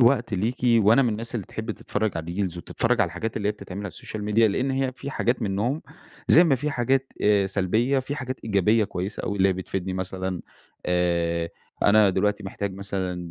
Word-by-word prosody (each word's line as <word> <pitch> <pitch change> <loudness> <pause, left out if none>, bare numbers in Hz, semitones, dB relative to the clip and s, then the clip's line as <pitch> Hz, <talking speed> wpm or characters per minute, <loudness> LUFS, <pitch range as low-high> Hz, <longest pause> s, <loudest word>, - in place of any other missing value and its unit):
وقت 120 -2 +3
ليكِ، 110 +7 -1
وأنا 115 +1 +5
من 125 - +2
الناس 115 +2 -3
اللي 105 -6 -3
تحب 110 0 -5
تتفرّج 110 0 -2
على 80 +1 -4
الريلز، 90 -2 -2
وتتفرّج 115 +6 0
على 105 - +4
الحاجات 110 +7 -4
اللي 105 -1 0
هي - - +1
بتتعمل 100 -2 -8
على 100 - -4
السوشيال 105 +3 -7
ميديا، 110 +2 +4
لإن 125 +7 0
هي 135 -1 0
في 140 +2 -7
حاجات 120 -1 0
منهم 110 +9 -1 0.5
زي 170 - +8
ما 150 - +4
في 145 +4 -2
حاجات 135 +1 0
آآ 100 -2 +4
سلبيّة، 110 +8 +1
في 135 +2 -4
حاجات 130 -2 -4
إيجابية 105 +1 +3
كويّسة 95 +1 -4
أوي 100 - -2
اللي 95 0 +5
هي - - +3
بتفيدني 95 0 -4
مثلًا، 95 -1 -3 0.5
آآ 85 -1 +1 0.3
أنا 105 -1 +6
دلوقتي 105 +3 0
محتاج 100 +1 -4
مثلًا 95 -3 -4
105 Hz, 200 wpm, -25 LUFS, 95-120 Hz, 0.5 s, زي